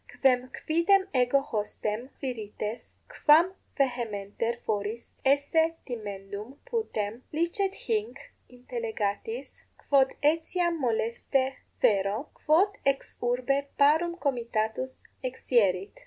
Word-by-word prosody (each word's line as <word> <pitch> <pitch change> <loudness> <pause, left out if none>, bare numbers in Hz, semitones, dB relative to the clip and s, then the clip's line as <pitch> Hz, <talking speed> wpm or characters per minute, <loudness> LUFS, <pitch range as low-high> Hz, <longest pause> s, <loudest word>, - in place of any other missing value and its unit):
Quem 255 -1 +4 0.2
quidem 375 +5 +4
ego 255 +1 +4
hostem, 215 -1 -3
Quirites, 220 -3 -5 0.3
quam 330 +5 +7 0.2
vehementer 235 -3 -1
foris 215 +2 -3
esse 285 +4 +3
timendum 210 +1 -6
putem, 245 - -2
licet 340 +5 0
hinc 435 0 0 0.3
intellegatis, 240 - -4 0.3
quod 270 -1 +5
etiam 335 +3 +2
moleste 260 +2 0 0.2
fero, 205 +6 +2 0.2
quod 365 +7 +5
ex 275 0 0
urbe 255 +3 +1
parum 320 +5 +4
comitatus 240 -3 -2 0.2
exierit. 215 -7 +1
255 Hz, 90 wpm, -28 LUFS, 220-310 Hz, 0.3 s, quam